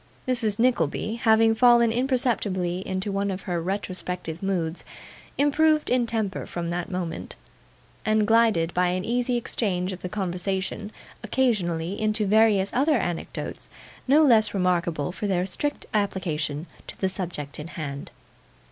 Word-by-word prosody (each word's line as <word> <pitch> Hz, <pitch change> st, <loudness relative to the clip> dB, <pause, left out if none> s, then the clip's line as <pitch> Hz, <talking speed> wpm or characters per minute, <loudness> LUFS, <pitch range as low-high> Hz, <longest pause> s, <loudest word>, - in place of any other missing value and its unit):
Mrs. 230 Hz, -5 st, +1 dB
Nickleby 225 Hz, -, +1 dB
having 225 Hz, -1 st, +4 dB
fallen 235 Hz, 0 st, +5 dB
imperceptibly 225 Hz, -8 st, 0 dB
into 190 Hz, +2 st, -2 dB
one 200 Hz, +1 st, -1 dB
of 190 Hz, 0 st, -4 dB
her 175 Hz, -2 st, -2 dB
retrospective 180 Hz, -3 st, -3 dB
moods, 180 Hz, -4 st, -2 dB, 0.5 s
improved 305 Hz, +2 st, +3 dB
in 245 Hz, -1 st, +2 dB
temper 220 Hz, -4 st, -2 dB
from 170 Hz, -1 st, -4 dB
that 175 Hz, 0 st, -3 dB
moment, 180 Hz, -3 st, -4 dB, 0.7 s
and 215 Hz, -1 st, +2 dB
glided, 220 Hz, -7 st, +3 dB
by 180 Hz, 0 st, +2 dB
an 180 Hz, +1 st, -1 dB
easy 245 Hz, +1 st, 0 dB
change 190 Hz, -5 st, -1 dB
of 185 Hz, -, -9 dB
the 180 Hz, -, -4 dB
conversation 190 Hz, +2 st, -3 dB, 0.3 s
occasionally, 200 Hz, -7 st, 0 dB
into 215 Hz, 0 st, +1 dB
various 205 Hz, -1 st, +3 dB
other 285 Hz, +3 st, +3 dB
anecdotes, 175 Hz, -6 st, -4 dB, 0.4 s
no 295 Hz, +4 st, +6 dB
less 220 Hz, -7 st, +4 dB
remarkable 175 Hz, -4 st, 0 dB
for 205 Hz, +3 st, -4 dB
their 185 Hz, -2 st, +1 dB
strict 290 Hz, +10 st, -3 dB
application 165 Hz, -7 st, -1 dB, 0.2 s
to -, -, -9 dB
the 190 Hz, -, +1 dB
subject 170 Hz, -7 st, -5 dB
in 150 Hz, -, -6 dB
hand. 140 Hz, -4 st, -6 dB
195 Hz, 140 wpm, -25 LUFS, 180-225 Hz, 0.7 s, no